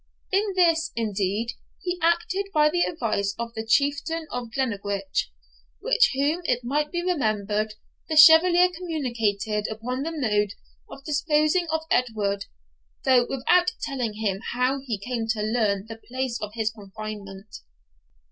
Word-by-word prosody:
In 395 +1 +1
this, 330 -3 +3
indeed, 210 0 -1 0.3
he 355 0 -3
acted 345 +4 +1
by 300 0 +5
the 350 +1 +1
advice 215 - -1
of 230 0 -5
the 220 - -4
Chieftain 285 +6 +1
of 245 -1 -4
Glennaquoich, 200 - -2 0.5
with - - 0
whom 290 +6 +1
it 250 -5 +1
may 295 +5 0
be 345 -1 -2
remembered 215 - 0 0.3
the 315 - -1
Chevalier 340 +3 +8
communicated 225 - -2
upon 240 +4 -4
the 320 +3 -3
mode 210 -9 0 0.4
of 275 - -11
disposing 305 +3 +1
of 320 0 0
Edward, 210 -5 0 0.6
though 250 -2 +4
without 350 +7 +2
telling 255 -7 -2
him 210 -3 -2
how 255 +3 +1
he 235 -6 -3
came 230 +2 -3
to 220 -1 -1
learn 215 -3 0
the 225 0 -10
place 255 -1 -2
of 210 0 -5
his 220 -1 0
confinement. 205 -1 -9
245 Hz, 140 wpm, -25 LUFS, 215-315 Hz, 0.6 s, Chevalier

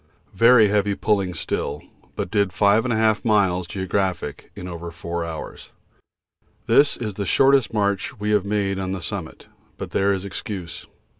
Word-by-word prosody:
Very 115 +1 +6
heavy 100 0 +1
pulling 100 -5 0
still, - - -3 0.3
but 90 - -4
did 100 -3 +1
5 110 +2 +2
miles 95 -5 +2
(geo.) 95 +2 -5 0.7
in 90 - -7
over 85 -1 -6
four 85 0 -5
hours. 80 -1 -8 0.9
This 145 0 +4
is 110 -3 -4
the 100 +1 -4
shortest 135 -3 +4
march 100 -2 -1
we 105 +1 -1
have 105 -3 +3
made 100 -1 -1
on 95 0 -3
the 95 - -5
summit, - - -6 0.3
but - - -7
there 100 +1 +2
is 95 0 -2
excuse. 100 -3 -7
100 Hz, 150 wpm, -22 LUFS, 90-105 Hz, 0.9 s, Very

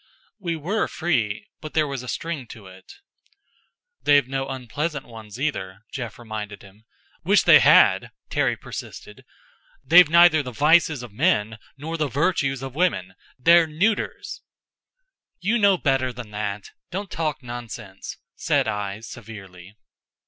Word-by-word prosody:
We 170 -4 -2
were 180 +8 -1
free 115 -12 -1
but 155 - -9
there 155 -1 +3
was 135 -2 -4
a 125 - -10
string 145 +1 -4
to 110 -3 -12
it. 95 0 -14 1.1
"They've 145 -3 +4
no 135 0 -3
unpleasant 135 +4 -4
ones, 110 -1 -11
either," 100 -10 -3
Jeff 120 -4 -6
reminded 110 -3 -7
him. 100 +3 -18 0.4
"Wish 200 +4 +4
they - - +8
had!" - - +5 0.2
Terry - - +1
persisted. - - -9 0.6
"They've 175 -2 +7
neither 170 -1 +6
the 130 -3 -7
vices 155 0 +3
of 120 -4 -10
men, 110 +1 +1 0.2
nor 160 +4 -5
the 155 -2 0
virtues 135 -2 0
of 135 -2 -6
women 115 - 0 0.2
they're 170 +4 +5
neuters!" 195 +8 -2 1.0
"You 215 +7 +1
know 200 -2 +4
better 135 -5 +1
than 120 -3 -10
that. 105 -1 -5 0.2
Don't 195 +2 -5
talk 155 -4 -3
nonsense," 120 -5 -8 0.2
said - - +1
I, 105 +1 -3
severely. 100 -5 -11
130 Hz, 140 wpm, -23 LUFS, 110-160 Hz, 1.1 s, they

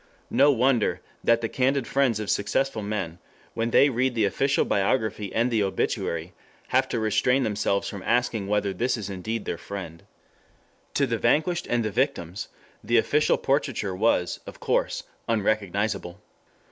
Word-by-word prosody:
No 145 +2 +5
wonder 125 -2 +2 0.2
that 115 0 +3
the 115 - -1
candid 130 +2 +1
friends 130 -5 +1
of 105 - -2
successful 110 +3 0
men, 100 -5 -4 0.3
when 115 0 -1
they 140 - +6
read 130 -1 0
the 110 -2 +3
official 135 +7 +1
biography 105 0 0
and 120 +2 +1
the 110 -2 +2
obituary, 85 -3 -2 0.4
have - - +2
to - - -1
restrain 110 +5 +2
themselves 105 -2 0
from 100 - -6
asking 115 -2 0
whether 100 -1 0
this 120 +6 0
is 105 -2 -5
indeed 110 +4 -4
their - - -3
friend. 90 -5 -7 1.0
2 140 - +2
To - - +5
the 115 -2 -1
vanquished 160 +8 +1
and 120 -2 +1
the 110 - -1
victims, 105 - -1 0.4
the 120 - +2
official 150 +6 +3
portraiture 130 -8 -1
was, 90 -4 +1
of - - -10
course, - - 0 0.3
unrecognizable. 100 -3 -1
110 Hz, 160 wpm, -25 LUFS, 100-125 Hz, 1.0 s, they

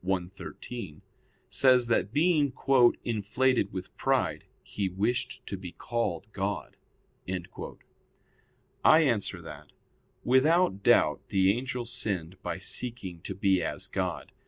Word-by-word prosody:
cxiii) 95 0 -5 0.5
says 125 -2 +4
that 115 -3 +1
being 150 -1 +3 0.5
"inflated 115 0 +1
with 95 0 -7
pride, - - 0 0.2
he 100 -2 -3
wished 120 +6 -2
to - - -4
be 90 -2 -8
called 115 -7 -2
God." 100 +1 -3 2.1
I 155 - +7
answer 105 - 0
that, 75 -2 -10 0.6
Without 130 - +3
doubt - - +3
the 95 0 +4
angel 125 0 -4
sinned 95 -7 -3
by - - -3
seeking 95 -2 -2
to 95 - -6
be 95 -2 +2
as 80 - -3
God. - - -3
100 Hz, 110 wpm, -29 LUFS, 95-125 Hz, 2.1 s, I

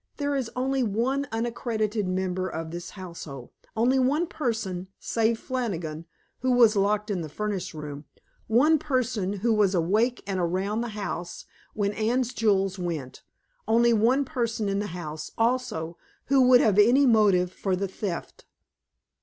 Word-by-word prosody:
"There 285 -1 -1
is 260 -4 -2
only 265 +1 0
one 250 +6 0
unaccredited 225 -2 -1
member 185 0 -1
of 160 0 -5
this 175 +1 -6
household; 170 -9 -9 0.3
only 250 +4 +3
one 285 +6 +2
person, 220 - -3
save 225 0 +1
Flannigan, 170 - -4 0.3
who 255 - +1
was 230 -3 +6
locked 210 +1 +1
in 185 -3 -1
the 155 - -6
furnace 190 0 -4
room, 150 -1 -7 0.4
one 290 +8 +4
person 250 -9 -1
who 210 +3 0
was 205 -3 +3
awake 215 +9 +1
and 195 -2 -2
around 190 +5 -1
the 240 - -2
house 175 -4 -5 0.3
when 205 -1 0
Anne's 235 +3 0
jewels 195 -3 +1
went, 160 -7 -4 0.5
only 235 +1 +4
one 245 +6 +3
person 230 -4 -2
in 195 0 0
the 205 - -2
house, 155 -2 -6
also, 225 -9 -1 0.3
who 265 -2 +4
would 250 -1 +7
have 210 -2 +3
any 245 +7 +6
motive 205 -7 +4
for 190 0 -1
the 195 +2 -2
theft." 190 -2 -6
210 Hz, 155 wpm, -26 LUFS, 185-240 Hz, 0.5 s, would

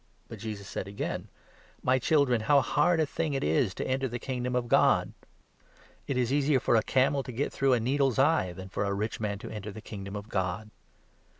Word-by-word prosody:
But - - -8
Jesus 105 -3 -6
said - - -4
24 100 - -10
again: - - -5 0.6
"My 130 +1 +3
children, 135 -4 +2
how 140 +6 +4
hard 170 +6 +2
a 160 - +3
thing 155 0 -2
it 135 - -1
is 80 +5 +1
to - - -3
enter 135 +1 0
the 120 0 -4
Kingdom 125 0 -3
of 125 -1 0
God! - - +3 1.0
It 135 - -1
is 125 +1 +1
easier 145 -1 +3
for 120 - +2
a 110 - +5
camel 135 +4 +2
to 130 - -7
get 130 +5 -2
through 135 - +1
25 125 - +5
a 115 - -4
needle's 135 -1 +1
eye, 135 - +3
than 95 +2 -9
for 100 - -2
a 100 0 -1
rich 105 +3 -3
man 105 -2 -2
to - - -9
enter 105 -1 -6
the 110 - -9
Kingdom 100 -2 -7
of 105 +1 -6
God." 100 +1 -2
120 Hz, 225 wpm, -29 LUFS, 105-135 Hz, 1.0 s, a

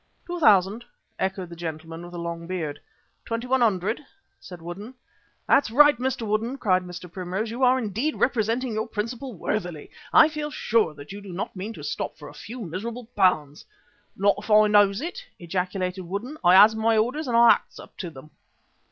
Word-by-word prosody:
"Two 350 0 -5
thousand," 210 - +4 0.4
echoed 190 -2 -2
the 170 - -9
gentleman 165 0 -6
with 175 0 -10
the - - -6
long 170 0 -5
beard. 165 -5 -4 0.4
"Twenty 230 +1 -4
one 260 0 +1
hundred," 215 +3 +1 0.4
said 180 -2 -11
Woodden. 195 +9 -8 0.5
"That's 275 - +4
right, 295 +5 +6
Mr. 255 -2 -2
Woodden," 220 +5 -1
cried 185 -7 +2
Mr. 180 0 -9
Primrose, 185 +5 -4
"you 240 +3 -5
are 255 +1 +5
indeed 240 +6 -2
representing 235 0 0
your 215 +1 -2
principal 235 +3 -5
worthily. 175 -4 -4 0.2
I - - +8
feel 305 -1 -4
sure 220 - +1
that 145 +2 -11
you 200 +1 -8
do 200 -2 -10
not 180 +3 -5
mean 200 +4 -5
to - - -10
stop - - -4
for - - -10
a - - -13
few 245 +2 -9
miserable 220 +7 -5
pounds." 155 -7 +2 0.5
"Not 200 +1 +3
if 210 - -11
I 215 0 +7
knows 205 0 +4
it," 360 +10 -5
ejaculated 180 +1 -3
Woodden. 200 - -5
"I 175 +1 +6
has 210 +3 +8
my 220 0 +2
orders 255 +8 0
and 235 -2 +2
I 235 0 +8
acts - - -1
up - - -13
to 180 - -5
them." 155 0 -13
210 Hz, 190 wpm, -25 LUFS, 180-235 Hz, 0.5 s, I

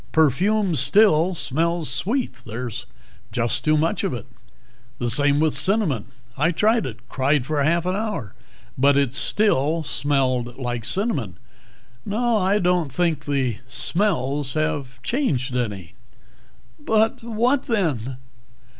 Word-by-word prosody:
"Perfume 180 - +2
still 165 - +4
smells 165 +3 0
sweet 210 - -1
there's 115 +1 -5 0.4
just 115 -1 -1
too 155 0 +3
much 160 +2 0
of - - -1
it. 115 - -7 0.7
The 120 -1 -1
same 145 +3 +3
with 155 -1 +2
cinnamon; 155 - +1 0.3
I 150 +4 +2
tried 220 - +2
it. 120 0 -10
Cried 140 0 +1
for 150 0 -1
half 165 +4 +2
an 185 +1 0
hour, 205 - -3 0.5
but 140 +1 +4
it 140 -3 +1
still 160 -2 +1
smelled 130 -4 -1
like 120 -3 -3
cinnamon. 150 - 0 0.7
No, 235 +3 0
I 195 +1 +2
don't 180 -6 +1
think 170 -3 0
the 130 -6 0
smells 145 -3 -1
have 140 -5 -2
changed 135 - -1
any." 105 -9 -3 0.9
"But 220 +8 +1
what, 235 +4 0
then?" 140 - -1
150 Hz, 130 wpm, -22 LUFS, 130-195 Hz, 0.9 s, still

